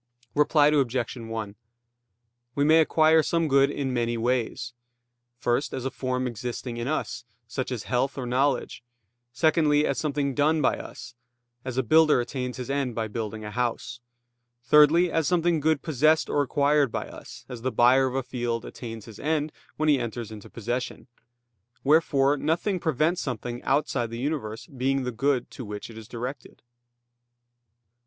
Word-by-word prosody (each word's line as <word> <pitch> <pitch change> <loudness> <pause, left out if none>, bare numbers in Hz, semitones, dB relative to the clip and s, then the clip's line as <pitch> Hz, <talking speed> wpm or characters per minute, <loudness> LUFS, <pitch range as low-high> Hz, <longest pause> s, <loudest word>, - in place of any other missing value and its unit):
Reply 150 0 +4
Obj. 130 -5 0
1: 115 -3 -6 1.0
We 140 - +2
may 160 +2 +6
acquire 160 0 +4
some 165 +1 0
good 140 -1 +4
in 140 -2 -2
many 120 -1 0
ways: 120 0 -1 0.6
first, 120 +4 0
as 130 - -5
a 135 - -1
form 130 -1 -2
existing 120 +1 -5
in 120 +1 -3
us, 155 -4 -2 0.2
such 130 +3 -4
as 120 -6 -3
health 135 +2 -1
or 130 - -3
knowledge; 130 0 0 0.5
secondly, 150 +2 +3
as - - -1
something 145 -2 -1
done 150 +3 +2
by 140 - +1
us, - - -9 0.5
as 130 -1 -5
a 130 - +2
builder 155 +3 +5
attains 125 +1 -4
his 125 - -5
end 135 -4 -1
by 110 -1 -1
building 110 0 -5
a 105 - -6
house; 125 +1 -2 0.6
thirdly, 150 +6 +5
as 160 -3 +1
something 170 -1 +2
good 155 -1 +1
possessed 155 +1 +2
or 145 - +2
acquired 145 -1 +2
by - - -3
us, - - -11
as 125 -2 -8
the 130 +2 -1
buyer 130 +3 +5
of 130 - -4
a 135 - 0
field 120 -2 -3
attains 115 -3 -8
his 110 -3 -12
end 155 0 -1 0.3
when 155 - 0
he 145 -3 +4
enters 115 -1 -5
into 105 -2 -10
possession. 120 +3 -4 0.8
Wherefore 145 -1 +3
nothing 170 +6 0
prevents 160 +2 +1
something 120 -1 -4
outside 135 -4 0
the 115 - -6
universe 125 -5 -3
being 135 -2 -1
the 125 - -2
good 130 +2 0
to 130 - -8
which 105 +1 -7
it 110 - -12
is 110 - -12
directed. 125 +3 -7
130 Hz, 165 wpm, -26 LUFS, 120-150 Hz, 1.0 s, may